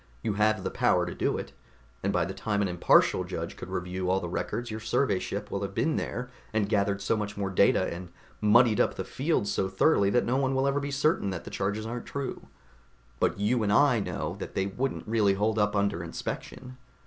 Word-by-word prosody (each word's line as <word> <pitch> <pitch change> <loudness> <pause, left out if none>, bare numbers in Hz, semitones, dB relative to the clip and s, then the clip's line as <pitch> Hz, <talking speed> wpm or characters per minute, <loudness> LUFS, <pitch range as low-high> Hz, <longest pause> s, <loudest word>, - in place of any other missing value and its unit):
You 105 - 0
have 110 +1 +2
the - - -2
power - - +2
to - - -5
do - - 0
it. - - -6 0.5
And 100 - 0
by 90 -4 +1
the 95 - -5
time 105 -1 -1
an - - +1
impartial 90 -1 +4
judge - - -5
could - - -9
review 90 +1 -3
all 95 +1 +3
the 90 - -5
records, 120 +6 -3
your 110 - -4
survey 110 -1 +1
ship 100 +3 -5
will 100 - -2
have 100 -1 -4
been 160 - +1
there 125 0 -3 0.2
and 110 -2 +1
gathered 100 -1 0
so 115 - +2
much 105 -1 -4
more 100 -1 -2
data 95 - +4
and 90 +1 -8 0.3
muddied 110 +1 +5
up - - +2
the - - -3
field 140 -6 -1
so 95 -1 0
thoroughly 100 +1 +3
that 120 +4 +2
no 125 +2 +1
one 135 -1 +1
will 135 +1 +2
ever 140 +1 +1
be 140 0 -4
certain 140 -6 +1
that 90 -3 -4
the - - -9
charges 105 +2 -2
aren't 120 +1 -5
true. 140 -2 -5 0.7
But - - +1
you 115 +4 +2
and 105 -1 +1
I 125 +1 +5
know 100 - -3
that - - -7
they 95 - +1
wouldn't 125 +7 -3
really 105 -3 +3
hold 110 +2 +1
up 105 0 +2
under 100 -4 0
inspection. 125 +9 -6
105 Hz, 225 wpm, -28 LUFS, 100-120 Hz, 0.7 s, muddied